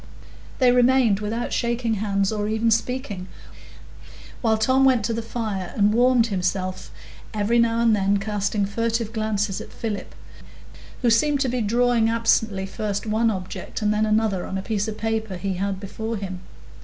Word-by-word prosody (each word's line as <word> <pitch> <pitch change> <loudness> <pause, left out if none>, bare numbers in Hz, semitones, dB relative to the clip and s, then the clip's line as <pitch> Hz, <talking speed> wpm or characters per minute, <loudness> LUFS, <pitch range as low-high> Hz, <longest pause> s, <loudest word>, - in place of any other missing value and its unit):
So - - -19 0.4
they 245 - +7
remained 245 -4 +4
without 225 +3 -3
shaking 235 -1 0
hands 200 -1 0
or 210 -1 -2
even 220 +1 +1
speaking, 230 -5 -1 1.1
while 220 -2 +2
Tom 260 +5 +3
went 255 -5 +4
to 230 - 0
the 230 - -2
fire 215 -5 -4
and 205 0 +3
warmed 245 0 +4
himself, 185 0 -2 0.5
every 215 +3 +2
now 230 0 +2
and 230 -2 +4
then 200 0 +2
casting 205 0 -1
furtive 230 +2 -2
glances 215 -3 -1
at - - -10
Philip, 220 -3 -5 0.9
who 240 - +4
seemed 290 +5 +3
to 265 - +1
be 250 0 -1
drawing 235 +1 +2
absently 225 -4 +1
first 205 +1 -3
one 220 +1 +2
object 190 +1 -5
and 210 0 +2
then 215 +1 +1
another 215 -3 +1
on 190 - -3
a 190 - -4
piece 210 -1 -1
of 215 -1 -5
paper 220 -3 -2
he 195 +1 -2
had 195 +1 -2
before 220 +3 -5
him. 190 -2 -5
220 Hz, 170 wpm, -23 LUFS, 200-230 Hz, 1.1 s, they